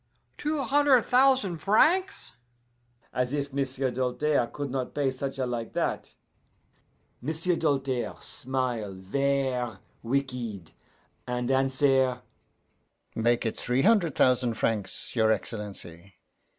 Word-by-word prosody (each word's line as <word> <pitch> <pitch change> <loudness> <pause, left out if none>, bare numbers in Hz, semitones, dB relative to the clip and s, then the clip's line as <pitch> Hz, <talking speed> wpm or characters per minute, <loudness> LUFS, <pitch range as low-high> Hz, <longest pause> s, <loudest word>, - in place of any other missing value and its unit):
Two 300 -1 -1
hunder' 280 0 +5
thousan' 250 -8 +3
francs!' 335 - +2 0.8
as 125 +1 -1
if 140 -1 -2
M'sieu' 135 -1 -1
Doltaire 130 +1 0
could 140 +2 -5
not 130 -1 -3
pay 140 -2 +1
such 135 +1 -5
a 130 - 0
like 120 -2 -4
that. - - -2 1.1
M'sieu' 160 +6 -1
Doltaire 135 -6 -1
smile 125 -6 -3
ver' 125 +2 -1 0.2
wicked, 120 - -3 0.6
and 125 +1 -1
answer, 130 -1 +2 0.9
'Make 120 +1 +1
it 110 - -1
three 125 +2 0
hunder' 205 -5 +4
thousan' 125 -4 +2
francs, 110 0 -3
your 110 -2 +4
Excellency. 100 -5 -5
130 Hz, 110 wpm, -27 LUFS, 120-145 Hz, 1.1 s, hunder